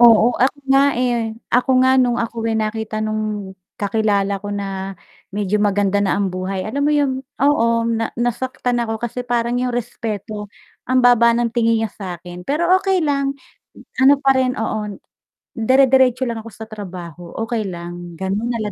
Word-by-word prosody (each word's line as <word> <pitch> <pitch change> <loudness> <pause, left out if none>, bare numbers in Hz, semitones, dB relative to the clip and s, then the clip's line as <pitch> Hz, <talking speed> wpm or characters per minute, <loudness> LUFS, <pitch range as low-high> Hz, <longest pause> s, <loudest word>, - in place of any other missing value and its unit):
oo, 230 -2 +7 0.2
ako 275 +2 0
nga, 270 0 +6 0.2
eh, 240 -3 0 0.2
ako 250 +2 +3
nga 260 - +5
nung 240 -1 +1
ako, 230 0 -5
eh, - - 0
nakita 215 0 -2
nung 215 -2 -3 0.2
kakilala 200 -1 +1
ko 205 - -5
na, 195 -1 -4 0.4
medyo 205 0 0
maganda 205 -1 +2
na 195 - +1
ang 200 -1 0
buhay 185 +1 -3
alam 260 +9 -2
mo - - +3
yung 265 -2 0 0.2
oo 280 -5 +4 0.2
na 225 0 -2
nasaktan 245 +1 -1
ako 225 -1 -2
kasi 245 +1 -4
parang 240 0 0
yung 250 -1 -1
respeto, 215 -3 -4 0.4
ang 255 0 +3
baba 235 -1 +5
ng 235 0 +1
tingin 230 -1 +2
niya 220 - -2
sa 190 -4 -6
akin, 175 +1 -10
pero 330 +5 +1
okey 380 -2 +1
lang, 280 -2 0 0.7
ano 275 +2 +8
pa 275 -1 +4
rin 260 -1 +2
oo, 210 -2 -3 0.6
dere-deretso 260 +1 +4
lang 230 -1 -3
ako 230 - -9
sa 220 +2 -9
trabaho, 175 -5 -8 0.2
okey 230 -2 -1
lang, 175 0 -8
ganon 195 +4 -1
na 235 - -2
lang 210 -1 -3
225 Hz, 175 wpm, -20 LUFS, 205-250 Hz, 0.7 s, ano